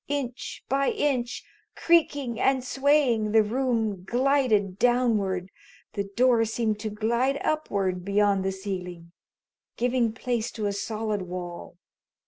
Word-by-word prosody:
Inch 270 -4 -4
by 275 +1 +1
inch, 250 -4 -1 0.3
creaking 285 -8 +2
and 265 -1 +2
swaying, 265 -5 +2
the 220 -1 +6
room 225 -4 -1
glided 235 -5 +1
downward. 210 -7 +1 0.4
The 200 - -2
door 235 +3 +3
seemed 220 -1 -1
to 215 - -3
glide 235 +6 0
upward 195 -12 -1
beyond 200 0 +2
the 190 - 0
ceiling, 180 -3 -6 0.7
giving 245 -1 +1
place 235 0 -2
to 215 -3 -4
a 200 - 0
solid 215 0 -3
wall. 175 -1 -7
225 Hz, 120 wpm, -26 LUFS, 200-255 Hz, 0.7 s, the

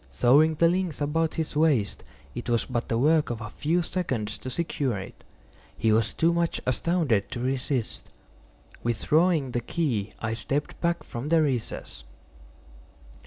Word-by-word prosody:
Throwing 150 +6 +4
the 165 +2 +4
links 180 -2 0
about 160 +2 0
his 160 -2 -3
waist, 150 -9 +2 0.3
it 120 0 -5
was 115 -1 +1
but 120 - -3
the 115 - +1
work 155 +5 +3
of 120 -2 -3
a 110 -2 -7
few 170 +4 0
seconds 130 - -2
to 130 - -6
secure 135 -5 -1
it. 95 +1 -9 0.5
He 110 0 +2
was 110 0 +2
too 165 +1 +3
much 170 -1 0
astounded 130 - +1
to - - -5
resist. 130 -1 -2 0.7
Withdrawing 150 +5 +2
the 120 - -1
key 115 - -1
I 110 -1 -2
stepped 140 +5 -3
back 170 0 0
from 120 +5 -5
the 165 -1 +4
recess. 125 - -3
140 Hz, 155 wpm, -26 LUFS, 115-160 Hz, 0.7 s, Throwing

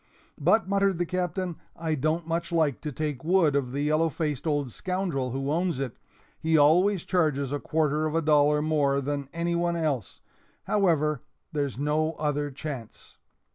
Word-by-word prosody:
"But," 220 - +3
muttered 200 -2 +2
the 175 - 0
Captain, 180 0 -2 0.2
"I 160 -1 -2
don't 155 +3 0
much 170 +2 -2
like 160 -5 +1
to 150 - -4
take 150 -2 -3
wood 165 -3 +3
of 130 -3 0
the 140 +2 -2
yellow 155 +2 +2
faced 150 -1 -3
old 145 -4 0
scoundrel 180 - -2
who 135 +3 -2
owns 170 -1 0
it 135 -4 -3 0.4
he 160 0 +2
always 175 +6 +4
charges 150 -7 +1
a 145 - -1
quarter 155 0 0
of 155 - -3
a 165 - +3
dollar 150 -1 +4
more 145 -3 +2
than 140 0 -3
any 170 +1 -1
one 170 0 +1
else; 145 - -2 0.4
however, 155 - +2 0.3
there's 140 -5 -2
no 155 +3 0
other 145 -1 -1
chance." 135 -5 -8
155 Hz, 170 wpm, -27 LUFS, 145-170 Hz, 0.4 s, always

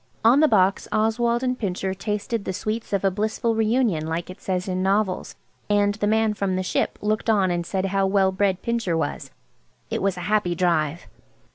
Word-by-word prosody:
On 245 +5 +6
the 310 - +6
box 195 -5 +2
Oswald 235 +3 +1
and 255 0 -1
Pincher 190 -2 -2
"tasted 210 +3 -3
the 190 - -3
sweets 220 +4 -4
of 200 -1 0
a 195 - +3
blissful 215 +3 -1
re 220 -1 +1
union," 215 -10 +1
like 170 +2 -3
it 185 - -13
says 185 0 -2
in 185 0 -1
novels. 195 0 0 0.3
And 205 0 +3
the 205 0 -2
man 220 0 +2
from 200 -2 -1
the 185 - -1
"Ship" - - -1
looked 215 +2 0
on 195 -4 +3
and 175 -1 -2
said 190 -1 -1
how 195 0 +1
well 190 -1 +3
bred 190 -1 0
Pincher 230 -8 0
was. 160 - -3 0.6
It - - -1
was 195 -2 0
a - - -5
happy 205 -2 +1
drive. 170 -2 0
200 Hz, 205 wpm, -23 LUFS, 185-220 Hz, 0.6 s, On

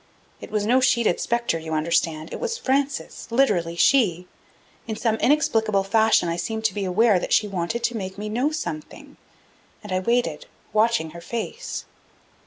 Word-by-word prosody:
It - - -10
was 210 -1 -1
no 250 +4 +4
sheeted 235 -7 +2
specter, 235 -8 0
you 160 0 -6
understand; 160 0 0
it - - -5
was 460 -1 -2
Frances, 275 - -2
literally 205 -10 +1
she. 180 -4 +3 0.6
In 220 - -3
some 220 0 0
inexplicable 225 -9 +2
fashion 220 -2 +3
I 170 0 -1
seemed 220 +5 -3
to 215 - +2
be 200 -1 -2
aware 195 +2 +3
that - - -2
she 215 - +3
wanted 195 +4 -3
to 235 -1 0
make 190 -2 -6
me 210 +1 -5
know 245 +7 0
something, 155 - -6 0.7
and 210 - -9
I 185 - +1
waited, 210 -6 0 0.3
watching 215 -7 +2
her 170 - -10
face. 235 - -5
215 Hz, 170 wpm, -23 LUFS, 175-235 Hz, 0.7 s, no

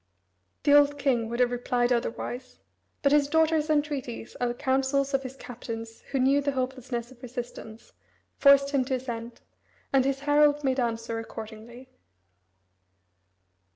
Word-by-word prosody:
The 285 - +4
old 290 0 +5
king 250 -5 +1
would 235 +1 -4
have 245 -1 +3
replied 245 0 +1
otherwise, 245 +2 -4 0.5
but 280 - +4
his 290 -1 +4
daughter's 320 0 +2
entreaties 290 -6 -2
and 245 - +2
the 240 - -3
counsels 270 +2 0
of 270 - +2
his 260 0 -8
captains 225 -3 -8
who 275 - -1
knew 270 +2 +3
the 280 0 -1
hopelessness 255 -2 -3
of 250 -2 -17
resistance, 240 -3 -8 0.4
forced 280 0 +5
him 275 -2 +2
to 260 0 0
assent, 235 -2 -6 0.5
and 270 -1 +5
his 275 0 -1
herald 295 0 +3
made 265 -1 +1
answer 230 -1 -2
accordingly. 225 +3 -9
260 Hz, 145 wpm, -27 LUFS, 240-280 Hz, 0.5 s, old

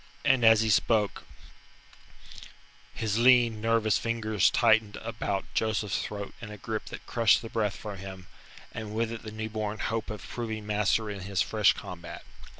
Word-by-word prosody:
And 130 -2 +4
as 110 -1 +7
he 110 -1 +1
spoke, 105 0 +1 1.7
his 110 0 -1
lean, 120 -3 +5
nervous 115 -2 +2
fingers 110 -4 +1
tightened 110 -3 +3
about 105 -3 -3
Joseph's 110 -2 0
throat 100 -1 -6
in 115 - -7
a 105 - -8
grip 110 +1 -4
that - - -9
crushed 115 -1 +3
the 115 - -6
breath 105 -3 -1
from 105 -2 -7
him, 95 -1 -9 0.5
and 110 -1 -6
with 115 0 0
it 115 - -6
the 110 - -8
new 110 0 -4
born 110 -1 -3
hope 115 0 -2
of 105 -2 -6
proving 110 -3 -5
master 105 +1 +1
in 100 - -6
his 95 0 0
fresh 105 -2 +3
combat. 85 -1 -9
110 Hz, 165 wpm, -28 LUFS, 105-115 Hz, 1.7 s, as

